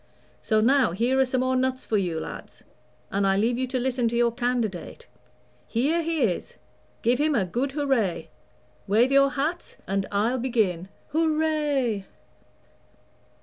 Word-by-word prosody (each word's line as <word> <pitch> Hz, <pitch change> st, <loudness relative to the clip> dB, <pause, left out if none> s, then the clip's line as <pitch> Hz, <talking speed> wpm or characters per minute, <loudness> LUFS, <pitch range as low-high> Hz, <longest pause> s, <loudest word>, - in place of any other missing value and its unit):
So 215 Hz, -1 st, +2 dB
now 255 Hz, -5 st, +3 dB
here 240 Hz, +7 st, +1 dB
are 265 Hz, -, +5 dB
some 255 Hz, 0 st, -1 dB
more 260 Hz, 0 st, +1 dB
nuts 260 Hz, 0 st, -1 dB
for 220 Hz, -, -1 dB
you, 175 Hz, -5 st, 0 dB
lads, -, -, -9 dB, 0.5 s
and 200 Hz, 0 st, +1 dB
I 195 Hz, 0 st, +2 dB
leave 235 Hz, +4 st, +1 dB
you 260 Hz, -, -1 dB
to 255 Hz, +1 st, -2 dB
listen 245 Hz, -2 st, 0 dB
to 235 Hz, -, -4 dB
your 235 Hz, 0 st, +3 dB
candidate. 235 Hz, -, -3 dB, 0.6 s
Here 290 Hz, +9 st, +1 dB
he 325 Hz, -3 st, 0 dB
is 185 Hz, -7 st, -2 dB, 0.5 s
give 240 Hz, +3 st, +2 dB
him 300 Hz, 0 st, +2 dB
a 205 Hz, -6 st, +2 dB
good 255 Hz, +9 st, -2 dB
hurray; 270 Hz, -, 0 dB, 0.6 s
wave 225 Hz, +6 st, +3 dB
your 275 Hz, 0 st, +5 dB
hats, 305 Hz, +6 st, -3 dB
and 195 Hz, 0 st, -1 dB
I'll 220 Hz, +5 st, +1 dB
begin. 215 Hz, -8 st, 0 dB, 0.3 s
Hurray!" 305 Hz, -9 st, +1 dB
245 Hz, 150 wpm, -25 LUFS, 215-275 Hz, 0.6 s, are